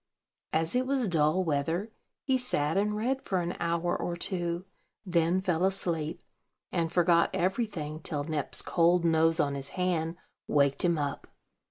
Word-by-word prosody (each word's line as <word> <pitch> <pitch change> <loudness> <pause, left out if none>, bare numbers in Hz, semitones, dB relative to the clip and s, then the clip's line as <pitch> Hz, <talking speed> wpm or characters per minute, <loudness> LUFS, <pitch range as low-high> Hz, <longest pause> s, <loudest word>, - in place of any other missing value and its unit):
As 160 +1 +1
it 255 +1 +1
was 265 -4 +1
dull 160 +1 +2
weather, 165 +7 -1 0.3
he 265 - +2
sat 160 - +1
and 210 +2 +1
read 260 +5 0
for 190 - -1
an 175 0 -2
hour 170 +1 0
or 175 - -2
two; 175 -1 -2 0.4
then 170 0 +2
fell 180 -2 0
asleep, 170 -5 -1 0.5
and 165 -2 0
forgot 170 -1 +4
everything 180 -6 -1
till 150 -2 -2
Nep's 150 -2 -1
cold 170 0 +3
nose 165 0 +3
on 140 -3 +2
his 140 0 -4
hand 170 -3 0 0.3
waked 140 -1 +2
him 170 -2 +2
up. 145 -1 -3
170 Hz, 155 wpm, -29 LUFS, 160-185 Hz, 0.5 s, forgot